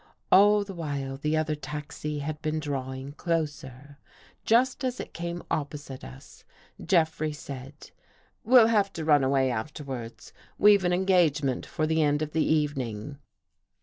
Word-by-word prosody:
All 205 +2 +6
the 200 -1 -8
while 140 -5 -4
the 150 +3 0
other 155 0 0
taxi 150 0 -5
had 155 0 -4
been 155 0 -1
drawing 135 -2 -4
closer. 145 -4 -4 0.4
Just 255 +4 +2
as 255 -1 -2
it - - -7
came 170 0 -5
opposite 145 -3 -4
us, 65 +2 -13 0.4
Jeffrey 160 -3 +1
said: 140 -1 -10 0.5
"We'll 245 -1 +7
have 205 -3 +2
to 160 -2 -5
run 145 -3 +4
away 130 -1 +2
afterwards. 125 -1 -6 0.2
We've 205 -1 +6
an 175 - +2
engagement 175 -8 +2
for 155 - -1
the 160 +1 +1
end 145 0 +2
of 150 - -5
the 160 0 +1
evening." 140 -4 -1
150 Hz, 145 wpm, -27 LUFS, 140-170 Hz, 0.5 s, We'll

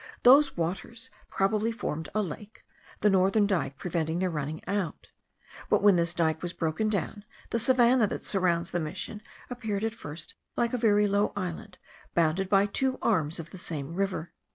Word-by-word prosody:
Those 275 +1 +6
waters 195 +9 -4 0.2
probably 210 +3 +1
formed 160 -8 -4
a 215 - +2
lake, 200 +5 -9 0.4
the 210 - +5
northern 195 +2 +3
dike 170 -9 -1
preventing 165 -2 -2
their 185 0 0
running 150 0 -4
out: 195 -6 -3 0.6
but, - - +3
when 205 -2 +7
this 170 0 +1
dike 160 -2 +1
was 175 0 -4
broken 165 +7 -1
down, 205 +1 -2 0.3
the 230 - +1
savannah 245 -1 +4
that - - -5
surrounds 180 -2 +1
the 175 - 0
mission 180 +6 -5 0.3
appeared 220 -4 -3
at 225 0 -1
first 155 -8 -9 0.2
like 235 0 +1
a - - +1
very 210 -2 +4
low 200 +1 +1
island, 185 +1 -5 0.4
bounded 170 +3 +2
by 195 0 +5
two 260 +6 -1
arms 165 -8 +1
of 165 0 -8
the 190 - -8
same 155 -3 -5
river. 185 -3 -2
195 Hz, 175 wpm, -28 LUFS, 165-215 Hz, 0.6 s, when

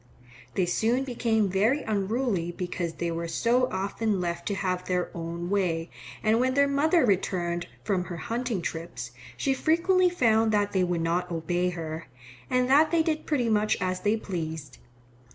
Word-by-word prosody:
They 185 - +2
soon 225 +8 +1
became 230 -5 +1
very 215 +10 +2
unruly 205 -3 -1
because 175 -1 -3
they 170 0 -2
were 170 0 -3
so 245 +8 +2
often 200 +2 -1
left 170 -1 -3
to 200 - 0
have 185 -1 -2
their 180 -1 -1
own 170 +1 -5
way, 175 -4 0 0.3
and 220 +1 +3
when 255 +1 +1
their 280 0 +5
mother 300 +3 +3
returned 175 -4 0 0.2
from 180 +3 0
her 175 -2 -6
hunting 230 -1 -2
trips 125 -9 -5 0.3
she 270 - +1
frequently 355 +6 +3
found 225 -9 +3
that 205 -1 +2
they 190 -2 +2
would 175 -2 0
not 175 +2 0
obey 175 +2 0
her, 165 -2 -5 0.4
and 250 0 +2
that 295 +4 +5
they 330 -1 +3
did 315 -1 -2
pretty 265 -6 +1
much 215 -1 +2
as 185 0 -1
they 210 +1 +1
pleased. 160 - -5
195 Hz, 170 wpm, -27 LUFS, 175-245 Hz, 0.4 s, their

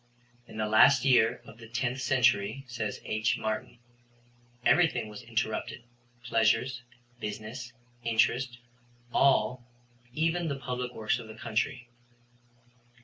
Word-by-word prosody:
In - - -11
the 110 - 0
last 120 +5 +5
year 120 -2 +4
of 115 - -14
the 115 - -11
10th 125 +2 -2
century, 125 -1 +2
says 115 -4 -4
H. 110 0 0
Martin, 110 +2 -4 0.9
everything 125 -5 +3
was 105 -1 -9
interrupted 115 +1 -3 0.4
pleasures, 120 +2 +1 0.4
business, 110 +3 -6 0.3
interest, 120 +2 +1 0.6
all, 125 -2 +3 0.5
even 165 +5 0
the 140 - -1
public 125 -2 -4
works 110 +3 0
of 115 - -9
the 110 - -10
country. 115 +3 -2
120 Hz, 115 wpm, -29 LUFS, 110-125 Hz, 0.9 s, last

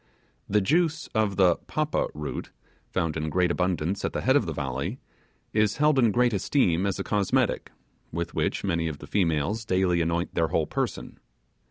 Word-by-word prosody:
The 105 +1 +3
juice 160 - +1
of 110 -3 +1
the 90 -3 +4
'papa' 155 0 -1
root 75 -1 -5 0.4
found 80 -4 -1
in 80 0 -2
great 90 +2 +2
abundance 90 +1 -1
at - - -1
the - - -2
head 130 +2 +3
of 120 -10 +3
the - - -2
valley, 70 - -3 0.6
is 105 -1 +2
held 150 -1 +4
in 120 -3 +5
great 120 +1 +2
esteem 95 - +2
as 95 - -1
a 100 - -2
cosmetic, 100 -2 0 0.4
with 85 +1 -3
which - - -1
many 85 -4 0
of 80 -3 -4
the - - -10
females 90 +4 0
daily 90 -4 +2
anoint 85 +1 -1
their 80 - +1
whole - - +1
person. - - -4
95 Hz, 180 wpm, -26 LUFS, 85-110 Hz, 0.6 s, in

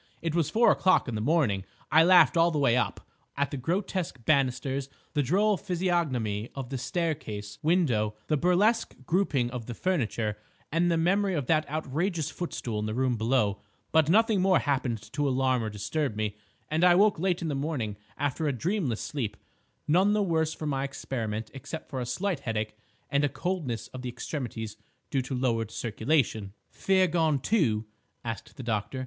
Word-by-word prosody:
It 165 -2 -1
was 170 -3 +1
four 235 +1 +5
o'clock 185 -5 +3
in 120 - -3
the 105 - -2
morning. 120 - +2 0.3
I 160 +3 +7
laughed 180 +1 +6
all 165 0 +5
the 160 - -2
way 135 -5 +3
up—at 140 +2 -3
the - - -3
grotesque 170 - -2
banisters, 135 -1 +1 0.2
the 150 - +2
droll 195 - +2
physiognomy 150 - -1
of 135 -2 -6
the 135 - -2
staircase 115 - -3
window, 130 - +2
the 155 - +1
burlesque 185 +9 +2
grouping 145 -9 +1
of 120 -3 -6
the 120 - -5
furniture, 115 - -1 0.3
and 170 +3 +2
the 165 - +2
memory 190 +3 +2
of 145 -5 -1
that 155 +1 +1
outrageous 155 +2 -1
footstool 120 -10 -4
in 105 - -2
the 110 - -3
room 130 -1 +1
below; 110 -3 +1 0.3
but 160 -1 +4
nothing 220 +1 +4
more 190 0 +4
happened 125 -6 -1
to 145 0 +1
alarm 130 -2 +1
or 110 - -2
disturb 110 +5 -2
me, 105 -1 -2 0.3
and 155 +3 0
I 180 -1 +7
woke 205 -1 +4
late 180 -1 0
in - - -1
the 150 - -1
morning 135 -7 -2 0.2
after 145 +2 -1
a - - +2
dreamless 155 - -1
sleep, 115 -9 -3 0.5
none 185 +7 +4
the 210 -1 +2
worse 160 -4 +1
for 160 - -6
my 135 -2 -1
experiment 115 -5 -4
except 145 +5 -8
for 130 -2 -3
a 120 - -4
slight 185 +2 -1
headache 110 -4 -3 0.4
and 140 +1 +2
a 145 - +3
coldness 160 - -3
of 130 - -8
the 125 - -4
extremities 120 -4 -5 0.3
due 135 - +1
to 130 +1 -4
lowered 115 -4 0
circulation." 110 -2 0 0.2
"Fear 190 -1 +3
gone, 160 -3 +2
too?" 130 - +1 0.4
asked 115 -2 -6
the 130 - -6
doctor. 115 +2 -2
140 Hz, 180 wpm, -28 LUFS, 120-170 Hz, 0.5 s, I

